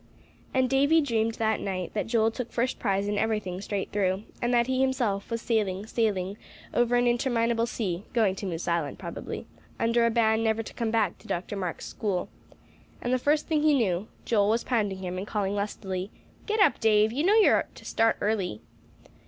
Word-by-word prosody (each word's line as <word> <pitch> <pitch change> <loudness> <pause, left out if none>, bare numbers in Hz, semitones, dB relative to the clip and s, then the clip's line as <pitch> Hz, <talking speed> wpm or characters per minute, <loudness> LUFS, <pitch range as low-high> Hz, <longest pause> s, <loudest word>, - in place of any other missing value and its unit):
And 260 -1 +2
Davie 280 +5 +4
dreamed 230 -6 0
that 220 -1 +1
night 185 -3 -4
that 210 - -2
Joel 225 -1 +2
took 240 +1 -5
first 250 +2 -1
prize 200 -2 0
in 205 0 0
everything 210 -5 -1
straight 200 -1 -3
through; 195 -1 0 0.2
and 240 - +1
that 240 -1 +4
he 260 +1 0
himself 240 -7 0
was 230 -1 -3
sailing, 205 -4 0
sailing, 205 -4 -1 0.3
over 240 0 +2
an 245 0 +3
interminable 235 -1 +1
sea 195 -6 -3
(going 220 -5 +2
to 200 - -4
Moose 170 -2 -4
Island 170 -4 -1
probably), - - -6 0.3
under 230 +1 +2
a - - +3
ban 220 -1 +2
never 225 0 +1
to - - -10
come 230 -2 -2
back 220 -5 0
to - - -16
Dr. 180 +4 -3
Marks' 185 -4 -4
school. 195 -5 -2 0.7
And 245 - -1
the 255 - +2
first 295 +4 +2
thing 310 -2 +1
he 305 -1 +4
knew, 200 -5 0 0.2
Joel 205 -3 +3
was 230 +2 +1
pounding 205 -6 -1
him 180 0 -3
and 195 - -5
calling 205 -2 -1
lustily, 195 -2 -3 0.4
"Get 435 0 0
up, 400 - +4
Dave; 215 -1 +4
you 275 +6 -1
know 395 +5 +4
you 445 - +6
are - - +2
to - - -13
start 225 0 +2
early." 200 - -1
220 Hz, 200 wpm, -27 LUFS, 195-240 Hz, 0.7 s, you